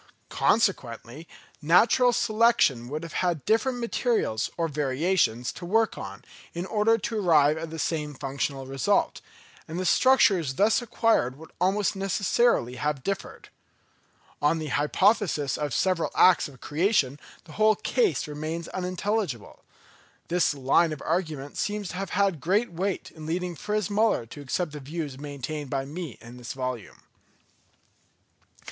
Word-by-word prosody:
Consequently 145 - 0 0.3
natural 230 - +4
selection 215 - +2
would 155 +3 -4
have 165 - -8
had 175 -5 -1
different 245 +4 +1
materials 230 - 0
or 165 -1 0
variations 140 -3 0
to - - -11
work 220 +6 +1
on, - - -8 0.3
in 175 +2 -3
order 220 +3 +2
to 225 +1 -3
arrive 155 -6 +4
at 160 0 -5
the 160 - -7
same 150 -2 -2
functional 135 0 -3
result; 135 -1 0 0.5
and 165 +3 -5
the 185 - -2
structures 185 - +4
thus 215 - +3
acquired 225 - +1
would 160 +1 -13
almost 195 +3 +1
necessarily 195 - +1
have 145 -2 -2
differed. 195 +3 -5 0.9
On 150 +3 +3
the 155 -2 -4
hypothesis 155 - +1
of 150 -1 -3
separate 185 +4 0
acts 185 -3 +5
of 135 -3 -15
creation 150 - +1 0.2
the - - -15
whole 215 +5 +3
case 445 - 0
remains 155 +3 -5
unintelligible. 185 - -3 0.7
This 170 -3 +2
line 140 +4 +2
of 150 - -8
argument 155 -5 -3
seems 205 -2 -2
to - - -6
have 195 -1 -4
had 195 -7 +1
great 200 +5 +1
weight 185 +3 -3
in 155 -1 -10
leading 180 +2 -2
Fritz 210 +4 -2
Müller 210 - +1
to 145 - -9
accept 155 +4 -2
the 150 - -7
views 145 -1 -6
maintained 145 0 -6
by 135 0 -2
me 155 -2 -7
in 120 +1 -12
this 120 -1 -7
volume. 130 -4 -6
165 Hz, 145 wpm, -26 LUFS, 145-200 Hz, 0.9 s, acts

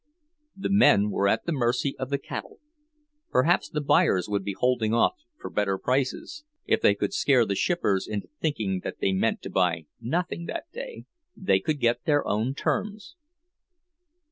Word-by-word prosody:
The 195 0 -3
men 105 - +5
were 100 - +1
at - - +1
the 170 - -1
mercy 130 0 0
of 130 - -3
the 140 - +1
cattle. 140 - -7 0.7
Perhaps 165 +7 +2
the 150 - -2
buyers 95 -9 +3
would 100 -1 -1
be 100 0 -3
holding 120 -3 +1
off 120 - +3 0.3
for - - -7
better 100 -2 0
prices—if 300 - -2
they 100 - +4
could 100 0 -2
scare 130 -5 +3
the 100 - -1
shippers 100 - 0
into 105 -2 -4
thinking 110 - -1
that - - -5
they 95 - +1
meant 95 - 0
to - - -6
buy 85 -4 +1
nothing 170 +8 -2
that - - -5
day, - - -8 0.3
they 190 - +2
could 155 -2 -2
get 120 +2 +1
their 145 -3 +2
own 110 +6 0
terms. 210 - -3
125 Hz, 170 wpm, -26 LUFS, 100-165 Hz, 0.7 s, men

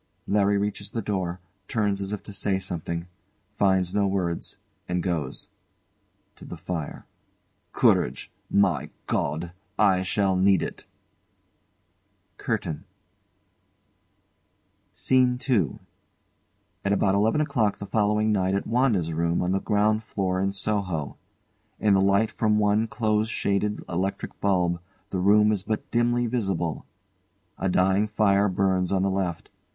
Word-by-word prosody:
LARRY 100 0 +2
reaches 100 0 -2
the 115 +1 -3
door, 95 -3 -2 0.3
turns 105 -4 0
as 100 0 -4
if 105 - -4
to 105 - -9
say 100 -1 0
something 85 -2 -4 0.5
finds 95 -2 +2
no 100 -1 +2
words, 90 -3 -2 0.3
and 90 -1 -1
goes. 80 -8 -3 0.9
[To - - -14
the 90 - -8
fire] 80 -2 -5 0.7
Courage! 65 +2 +2 0.2
My 95 -8 +2 0.2
God! 80 +4 -2 0.3
I 95 -3 +4
shall 95 0 +1
need 95 +1 +4
it! - - -7 1.5
CURTAIN 80 - -2 2.1
SCENE 125 +4 +3
II 100 - +1 1.1
At 100 - +1
out 95 - +3
eleven 110 +8 +2
o'clock 115 -9 +1
the 100 - -6
following 105 +1 +1
night 95 -2 +1
an 100 - 0
WANDA'S 115 -9 +1
room 85 +2 0
on 90 - 0
the 95 - +1
ground 110 +1 +1
floor 95 -3 -1
in 95 0 +1
Soho. 100 -7 -2 0.6
In 105 -2 +3
the 95 - +4
light 100 +3 +3
from 105 -1 +1
one 105 +1 +2
close 110 -1 0
shaded 105 -1 -1
electric 95 +3 -3
bulb 90 -3 +1 0.3
the 95 - -1
room 105 +3 +5
is 105 -3 0
but 110 +2 -4
dimly 120 +1 +2
visible. 95 -9 -2 0.7
A 95 - 0
dying 95 +3 +3
fire 105 -1 +3
burns 95 -1 +1
on 95 -1 +2
the 95 - +1
left. 95 -3 -3
100 Hz, 135 wpm, -25 LUFS, 90-105 Hz, 2.1 s, room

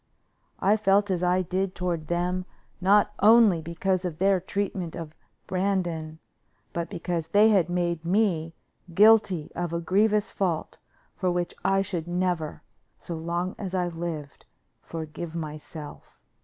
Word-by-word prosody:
I 205 +3 +3
felt 205 -1 +3
as 180 -2 0
I 180 +1 +2
did 185 +1 -2
toward 170 -3 -2
them 180 +2 -1 0.4
not 200 +3 +4
only 215 -5 +6
because 175 +3 -1
of 175 -4 -4
their 190 +2 +3
treatment 190 -2 -3
of 160 -2 -7 0.3
Brandon, 175 -5 -1 0.6
but 170 0 -3
because 170 -3 -3
they 205 +5 +5
had 190 -5 +3
made 175 -2 -1
me 170 -4 +1 0.4
guilty 205 -6 +5
of 175 -1 -3
a 170 - 0
grievous 210 +4 +2
fault, 175 -5 -2 0.4
for 185 - 0
which 175 0 -1
I 195 0 +3
should 175 -4 -4
never, 175 -4 -2 0.3
so 170 - -6
long 170 +3 -2
as 190 -2 -4
I 180 -1 0
lived, 165 -4 -6 0.3
forgive 160 +1 -7
myself. 155 -1 -8
180 Hz, 140 wpm, -26 LUFS, 165-195 Hz, 0.6 s, only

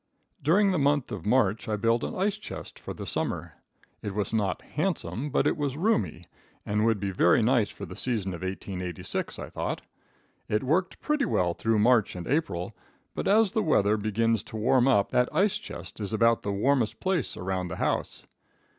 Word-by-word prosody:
During 195 +7 +4
the 180 - +1
month 145 -1 +2
of 100 -1 -5
March 110 -3 +2
I 105 - +1
built 115 +2 +1
an - - -3
ice 195 +2 +1
chest 215 - -9
for - - -7
this - - -6
summer. - - -2 0.5
It 100 -2 -5
was 105 0 -2
not 100 -5 0
handsome, 105 - -2
but - - +1
it - - +2
was 145 -2 -2
roomy, 165 - 0 0.4
and 105 +1 +1
would 110 -3 +2
be 100 0 -2
very 90 +4 +4
nice 120 -2 +3
for - - -8
the - - -9
season 105 -7 -1
of 85 - -7
1886, 95 -2 -4
I - - -7
thought. - - -3 0.7
It 105 0 +1
worked 170 +8 0
pretty 300 -2 +1
well 90 - +1
through 115 +5 0
March 110 -1 +3
and 90 -1 -6
April, 100 - -1 0.4
but - - -3
as 210 0 +4
the 220 0 +1
weather 105 - +3
begins 110 +1 +1
to 110 - -7
warm 125 +3 +3
up 105 -7 +3
that 125 0 +3
ice 200 +1 +2
chest 90 +4 -9
is 105 0 -4
about 115 +1 +3
the 100 - -2
warmest 115 +3 +1
place 185 -6 -1
around 90 0 -2
the 90 - -5
house. - - -2
115 Hz, 190 wpm, -27 LUFS, 100-140 Hz, 0.7 s, During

